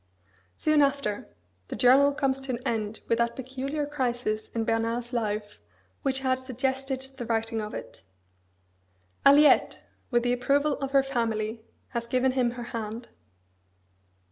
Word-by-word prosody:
Soon 310 -1 +3
after, 275 -7 0 0.4
the - - -5
journal 270 +3 +6
comes 275 -2 0
to 270 -1 -4
an - - -1
end 220 -2 -2
with 230 - +1
that 235 0 +1
peculiar 265 +3 -3
crisis 245 -6 -2
in 225 - +1
Bernard's 230 +2 -1
life 210 - -2 0.4
which 265 -1 0
had 260 -1 +1
suggested 265 +1 -2 0.2
the 240 - -3
writing 225 -1 -1
of 210 0 -6
it. - - -8 1.3
Aliette, 290 +1 +5 0.3
with 240 -2 +2
the 245 0 +2
approval 280 +4 +2
of 275 - -2
her 275 -1 +5
family, 225 -4 -2 0.3
has 235 -2 -4
given 255 +1 +2
him 255 -2 +2
her 240 - -4
hand. 225 +1 -5
245 Hz, 140 wpm, -27 LUFS, 225-270 Hz, 1.3 s, journal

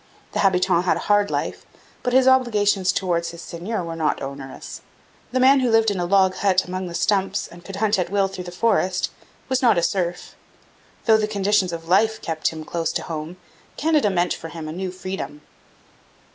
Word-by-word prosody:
The - - -3
habitant 180 -2 +3
had - - +2
a - - -5
hard 205 0 +2
life, - - -3 0.4
but 250 - -1
his 260 +1 +4
obligations 210 -7 +3
towards 175 -3 -1
his 170 0 -9
seigneur 180 +4 -4
were 165 -1 -5
not 160 -2 0
onerous. 135 -1 -8 0.5
The 255 - +1
man 265 +2 +6
who 255 -2 +1
lived 225 -1 +4
in 195 - -3
a 175 - 0
log 190 0 +4
hut 190 -2 +2
among 185 0 -4
the 170 - -6
stumps 195 +1 0
and 175 0 -14
could 195 - -8
hunt 210 0 +1
at 175 -1 -1
will 200 0 +2
through 190 -2 -7
the 175 - -7
forest 185 -1 +1 0.4
was 260 -1 0
not 235 -7 +4
a 170 - +2
serf. 175 -2 -2 0.7
Though 220 -2 +6
the 215 -1 0
conditions 200 -3 +1
of 165 -1 -6
life 220 +5 +3
kept 160 -1 -2
him 160 -1 -8
close 165 -1 -2
to - - -2
his - - -10
home, 160 +2 -5 0.4
Canada 305 -7 +2
meant 180 -2 +1
for 165 - -7
him 160 -1 -7
a - - -5
new 185 +3 -4
freedom. 185 -5 -6
190 Hz, 205 wpm, -22 LUFS, 170-210 Hz, 0.7 s, man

